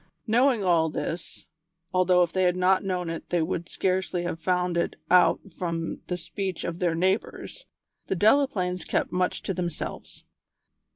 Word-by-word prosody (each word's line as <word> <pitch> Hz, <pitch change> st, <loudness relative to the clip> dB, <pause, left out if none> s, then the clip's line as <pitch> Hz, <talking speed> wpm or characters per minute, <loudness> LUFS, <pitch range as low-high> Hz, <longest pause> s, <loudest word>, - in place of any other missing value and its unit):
Knowing 240 Hz, 0 st, +3 dB
all 170 Hz, -3 st, +3 dB
this, 165 Hz, +2 st, -5 dB, 0.5 s
although 180 Hz, -1 st, +4 dB
if 175 Hz, -, -2 dB
they 185 Hz, -, +1 dB
had 180 Hz, -1 st, +3 dB
not 185 Hz, +1 st, +3 dB
known 180 Hz, -2 st, -2 dB
it 165 Hz, 0 st, -6 dB
they 175 Hz, -, +1 dB
would 170 Hz, +1 st, -2 dB
scarcely 185 Hz, -1 st, -1 dB
have 175 Hz, -2 st, -3 dB
found 180 Hz, +1 st, 0 dB
it 170 Hz, -, 0 dB, 0.2 s
out 180 Hz, -1 st, +6 dB, 0.2 s
from 165 Hz, -2 st, -3 dB
the 180 Hz, -, -2 dB
speech 185 Hz, +1 st, -4 dB
of 170 Hz, +1 st, -4 dB
their 175 Hz, -2 st, +1 dB
neighbours, 190 Hz, -, -2 dB, 0.4 s
the -, -, 0 dB
Delaplaines 195 Hz, -, +2 dB
kept -, -, -1 dB
much 180 Hz, 0 st, -1 dB
to 195 Hz, -, -2 dB
themselves. 175 Hz, -3 st, -5 dB
180 Hz, 160 wpm, -26 LUFS, 170-190 Hz, 0.5 s, out